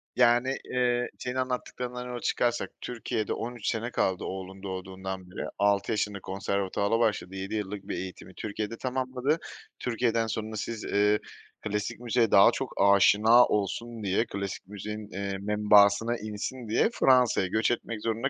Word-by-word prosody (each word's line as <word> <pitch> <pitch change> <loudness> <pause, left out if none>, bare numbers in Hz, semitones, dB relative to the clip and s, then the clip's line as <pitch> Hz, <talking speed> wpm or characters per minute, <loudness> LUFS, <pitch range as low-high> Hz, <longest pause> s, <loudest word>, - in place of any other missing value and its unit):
Yani, 120 +3 +4
eee, 125 -1 +1
senin 125 0 -4
anlattıklarından 125 -1 -3
yola 125 -1 -5
çıkarsak 120 -1 0
Türkiye’de 110 -3 -3
13 120 -2 -5
sene 115 +2 -1
kaldı 95 -5 0
oğlun 95 0 -6
doğduğundan 95 -1 -6
beri. - - -4
6 100 +1 +2
yaşında 105 -2 -1
konservatuvara 100 +3 -1
başladı, 105 -5 0
7 95 +3 -4
yıllık 100 -1 -4
bir - - -3
eğitimi 95 0 -7
Türkiye’de 110 +1 -4
tamamladı. 130 +4 -1 0.4
Türkiye’den 115 -1 0
sonra 110 0 -4
siz, 110 +1 -4
ııı, 105 +1 +2 0.4
klasik 105 +2 -3
müziğe 120 -1 +1
daha 100 +4 +8
çok 135 +1 -4
aşina 105 +4 +6
olsun 110 +3 -2
diye, 100 +4 +1
klasik 100 -3 -5
müziğin, 105 +1 -6
eee, 100 0 -3
membasına 105 +2 +4
insin 110 +4 -5
diye 110 - +3
Fransa’ya 125 - +4
göç 110 +6 +1
etmek 115 -2 -3
zorunda 115 +4 0
110 Hz, 145 wpm, -28 LUFS, 100-120 Hz, 0.4 s, daha